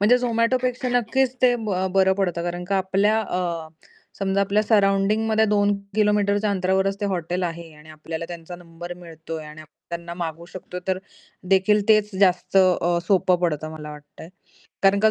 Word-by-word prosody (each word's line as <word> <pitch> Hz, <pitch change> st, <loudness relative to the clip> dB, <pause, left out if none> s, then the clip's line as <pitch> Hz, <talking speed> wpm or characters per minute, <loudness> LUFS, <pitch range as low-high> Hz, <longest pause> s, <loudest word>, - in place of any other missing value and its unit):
म्हणजे 230 Hz, +5 st, +5 dB
झोमॅटोपेक्षा 250 Hz, +1 st, 0 dB
नक्कीच 245 Hz, +2 st, +1 dB
ते 245 Hz, -1 st, +5 dB, 0.4 s
बरं 190 Hz, 0 st, +4 dB
पडतं, 175 Hz, -3 st, 0 dB
कारण 175 Hz, +1 st, -4 dB
का 195 Hz, +2 st, 0 dB
आपल्या 195 Hz, +3 st, +2 dB
अ, 185 Hz, -3 st, -3 dB, 0.8 s
समजा 195 Hz, 0 st, 0 dB
आपल्या 200 Hz, +2 st, +2 dB
सराउंडिंगमध्ये 215 Hz, +1 st, +2 dB
2 205 Hz, 0 st, +3 dB, 0.2 s
किलोमीटरच्या 210 Hz, -1 st, +2 dB
अंतरावरच 190 Hz, +1 st, 0 dB
ते -, -, -1 dB
हॉटेल 175 Hz, +1 st, -3 dB
आहे 170 Hz, -2 st, -5 dB
आणि 150 Hz, +1 st, -17 dB
आपल्याला 160 Hz, +1 st, -6 dB
त्यांचा 175 Hz, 0 st, -8 dB
नंबर 175 Hz, 0 st, -9 dB
मिळतोय 165 Hz, -2 st, -8 dB
आणि 150 Hz, +1 st, -10 dB, 0.3 s
त्यांना 170 Hz, 0 st, -6 dB
मागू 170 Hz, -1 st, -5 dB
शकतो 180 Hz, -1 st, -7 dB
तर 185 Hz, 0 st, +1 dB, 0.5 s
देखील 200 Hz, +2 st, +4 dB
तेच 215 Hz, -1 st, +4 dB
जास्त 180 Hz, -1 st, +2 dB, 0.5 s
सोपं 185 Hz, -3 st, +3 dB
पडतं 155 Hz, -3 st, -1 dB
मला 155 Hz, -1 st, -8 dB
वाटतंय. 150 Hz, +2 st, -12 dB, 0.5 s
कारण 195 Hz, +1 st, +4 dB
का 220 Hz, -, +5 dB
190 Hz, 150 wpm, -23 LUFS, 170-210 Hz, 0.8 s, म्हणजे